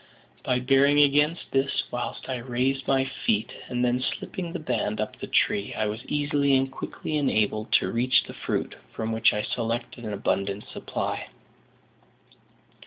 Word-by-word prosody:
By 125 Hz, -, +1 dB
bearing 135 Hz, +3 st, +4 dB
against 150 Hz, +3 st, +3 dB
this 135 Hz, +1 st, +1 dB
whilst 120 Hz, 0 st, -4 dB
I 130 Hz, -1 st, -2 dB
raised 130 Hz, +2 st, -1 dB
my 135 Hz, -1 st, +3 dB
feet 115 Hz, -4 st, 0 dB, 0.2 s
and 125 Hz, 0 st, 0 dB
then 125 Hz, +1 st, +1 dB
slipping 170 Hz, +6 st, -4 dB
the 180 Hz, -, -3 dB
band 120 Hz, -8 st, -1 dB
up 110 Hz, -, -3 dB
the -, -, -5 dB
tree, 100 Hz, 0 st, +1 dB
I 110 Hz, -, 0 dB
was 105 Hz, +3 st, -3 dB
easily 145 Hz, -2 st, +2 dB
and 135 Hz, 0 st, 0 dB
quickly 155 Hz, +3 st, -4 dB
enabled 110 Hz, -6 st, +1 dB
to -, -, +3 dB
reach 125 Hz, +2 st, +3 dB
the -, -, -9 dB
fruit, -, -, -2 dB, 0.2 s
from 110 Hz, 0 st, -2 dB
which 110 Hz, 0 st, +4 dB
I 105 Hz, -, -1 dB
selected 120 Hz, +1 st, -3 dB
an 105 Hz, -2 st, -3 dB
abundant 100 Hz, 0 st, -1 dB
supply. -, -, -4 dB
125 Hz, 160 wpm, -26 LUFS, 110-140 Hz, 0.2 s, bearing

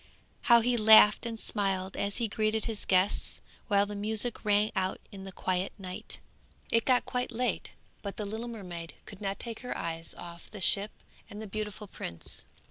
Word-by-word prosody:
how 235 Hz, -1 st, +8 dB
he 245 Hz, +1 st, +2 dB
laughed 215 Hz, 0 st, +7 dB
and 225 Hz, -1 st, -5 dB
smiled 195 Hz, -3 st, -1 dB
as 200 Hz, 0 st, -2 dB
he 235 Hz, -, 0 dB
greeted 215 Hz, 0 st, 0 dB
his 225 Hz, -3 st, -4 dB
guests, 185 Hz, +1 st, +1 dB, 0.3 s
while 200 Hz, -2 st, +4 dB
the 205 Hz, -, -7 dB
music 220 Hz, +3 st, -1 dB
rang 210 Hz, 0 st, +3 dB
out 190 Hz, -1 st, -1 dB
in 195 Hz, -1 st, -9 dB
the 195 Hz, -, -7 dB
quiet 185 Hz, 0 st, -1 dB
night. 185 Hz, -2 st, -5 dB, 0.5 s
It 230 Hz, -1 st, +3 dB
got 255 Hz, -2 st, +3 dB
quite 250 Hz, 0 st, -2 dB
late, 245 Hz, +1 st, -2 dB, 0.3 s
but 200 Hz, -1 st, -6 dB
the 210 Hz, -, -3 dB
little 220 Hz, +4 st, -5 dB
mermaid 180 Hz, -8 st, -7 dB
could 200 Hz, 0 st, -11 dB
not 195 Hz, -1 st, -2 dB
take 230 Hz, -2 st, -5 dB
her 250 Hz, -, -5 dB
eyes 165 Hz, 0 st, -4 dB
off 170 Hz, -1 st, -10 dB
the 210 Hz, -, -9 dB
ship 200 Hz, +3 st, +7 dB, 0.4 s
and 205 Hz, -, -9 dB
the 220 Hz, -, -6 dB
beautiful 210 Hz, 0 st, -5 dB
prince. 85 Hz, -, -8 dB
210 Hz, 185 wpm, -30 LUFS, 190-220 Hz, 0.5 s, how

